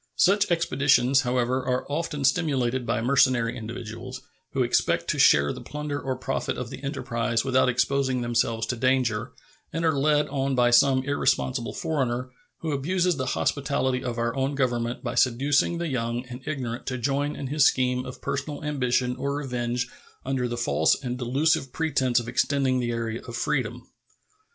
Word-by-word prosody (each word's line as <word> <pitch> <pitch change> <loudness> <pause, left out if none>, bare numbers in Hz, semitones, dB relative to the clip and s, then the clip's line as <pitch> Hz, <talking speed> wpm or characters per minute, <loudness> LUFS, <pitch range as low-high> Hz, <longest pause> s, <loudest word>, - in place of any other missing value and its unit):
Such 200 +2 +4
expeditions, 140 -6 +3
however, 125 0 0
are 125 0 -1
often 150 -1 -3
stimulated 130 -6 +1
by 115 - 0
mercenary 125 -2 +3
individuals, 120 +2 -7 0.3
who 130 - +2
expect 120 - +1
to - - 0
share 70 0 +5
the - - -9
plunder 150 -1 -4
or 130 -1 -2
profit 130 +1 -3
of 125 -2 -5
the 135 - -9
enterprise 120 -3 -1
without 130 -1 +3
exposing 130 +1 +1
themselves 115 -1 0
to 125 - -2
danger, 125 -2 0 0.4
and 165 +1 -2
are 160 -2 +3
led 150 +1 +2
on 135 -1 -1
by 120 -1 +3
some 130 +1 +5
irresponsible 130 -3 0
foreigner, 130 -4 -2 0.3
who 160 - -2
abuses 175 +4 0
the 130 -1 -2
hospitality 135 -2 0
of 125 -2 -3
our 115 0 -1
own 135 +1 -1
Government 120 -2 -1
by 120 -2 -3
seducing 135 +6 +2
the 170 0 -2
young 120 -2 -2
and 125 0 -9
ignorant 125 -5 -4
to 130 - -2
join 140 +4 -1
in 140 - -6
his 145 +1 +3
scheme 125 -1 +2
of 125 - -9
personal 140 +2 -3
ambition 125 -4 0
or 140 0 -2
revenge 125 -3 -2 0.4
under 130 -2 -1
the 120 0 -4
false 120 - +2
and 125 -1 -5
delusive 135 +2 +1
pretense 135 -6 +1
of 120 - -7
extending 130 +1 +1
the 120 -1 -1
area 115 -1 -3
of 120 - -6
freedom. - - -2
130 Hz, 170 wpm, -26 LUFS, 120-140 Hz, 0.4 s, share